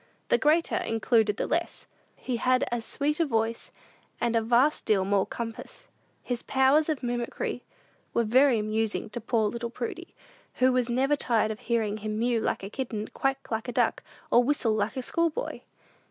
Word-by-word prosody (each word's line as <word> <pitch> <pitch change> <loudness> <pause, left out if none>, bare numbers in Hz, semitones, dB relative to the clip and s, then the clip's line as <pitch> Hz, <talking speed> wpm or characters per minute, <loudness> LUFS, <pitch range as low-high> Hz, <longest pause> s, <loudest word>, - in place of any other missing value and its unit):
"The - - +4
greater 315 +2 +2
included 225 -2 +1
the - - -1
less." 340 +1 -2 0.3
He 250 -2 -3
had 255 +2 +2
as 240 -1 -2
sweet 300 +2 -1
a 335 - +3
voice, 225 -2 -1 0.5
and 235 -1 0
a 230 - +3
vast 245 +6 +3
deal 195 -3 +2
more 195 -1 +2
compass. 230 -1 -7 0.4
His 245 -1 -3
powers 275 +4 +3
of 300 -4 -2
mimicry 240 -1 -3 0.5
were 235 - +1
very 255 +3 +4
amusing 215 0 -1
to 240 - -5
poor 225 -1 +1
little 235 +2 -4
Prudy, 250 +9 -6 0.4
who 255 0 +3
was 250 -1 +1
never 265 +4 +2
tired 225 -5 +1
of 215 - -6
hearing 220 -3 -1
him 215 0 -4
mew 235 0 +1
like - - -1
a 195 - -5
kitten, 220 -5 -4
quack 270 -1 -2
like 220 +2 -2
a - - -2
duck, - - +1 0.3
or 240 - +6
whistle 250 -4 +1
like 215 +3 -1
a 260 - -2
schoolboy. 335 +3 -1
235 Hz, 180 wpm, -27 LUFS, 220-265 Hz, 0.5 s, or